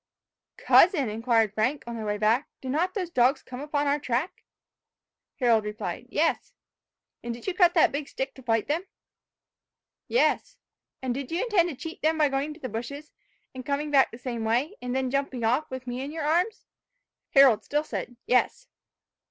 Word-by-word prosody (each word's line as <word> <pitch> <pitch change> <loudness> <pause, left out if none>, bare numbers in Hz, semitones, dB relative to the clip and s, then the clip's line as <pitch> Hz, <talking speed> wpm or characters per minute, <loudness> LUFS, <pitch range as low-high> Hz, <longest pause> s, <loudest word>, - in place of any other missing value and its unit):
"Cousin," 315 - +5
inquired 225 -1 +1
Frank, 250 +7 0
on 235 0 -6
their 220 -2 -5
way 210 0 -1
back, 220 +6 +1
"did 260 - -5
not 350 - 0
those 365 -4 -3
dogs 255 0 +3
come 250 0 -8
upon 290 0 -1
our 285 +1 +1
track!" 270 +6 -2 1.0
Harold 235 -4 +3
replied, 210 +1 -5
"Yes." 325 +4 0 0.7
"And 235 0 -4
did 235 - -12
you 380 - -1
cut 355 -1 +4
that 330 - +5
big 285 0 -4
stick 265 0 -4
to 265 - -14
fight 225 -3 0
them?" 330 +6 -1 1.2
"Yes." 485 - +1 0.5
"And 255 -2 -1
did 270 0 -5
you 335 - 0
intend 395 -8 +2
to 305 - -6
cheat 325 +5 -8
them 315 +1 +2
by 300 -2 +3
going 275 +1 0
into 305 +1 -8
the 265 - -5
bushes, 255 +7 -6 0.4
and 260 -1 -7
coming 290 +2 -2
back 275 -2 +5
the 235 - -10
same 240 -2 -4
way, 245 - 0
and 250 0 -3
then 260 -1 -1
jumping 275 -3 -2
off, 250 +7 +1
with 260 -1 -7
me 245 +1 -4
in 280 +2 -5
your 320 0 -4
arms?" 350 +8 0 0.7
Harold 270 -5 +7
still 295 +1 -1
said, 245 -5 -5
"Yes." - - +1
270 Hz, 185 wpm, -26 LUFS, 240-305 Hz, 1.2 s, Harold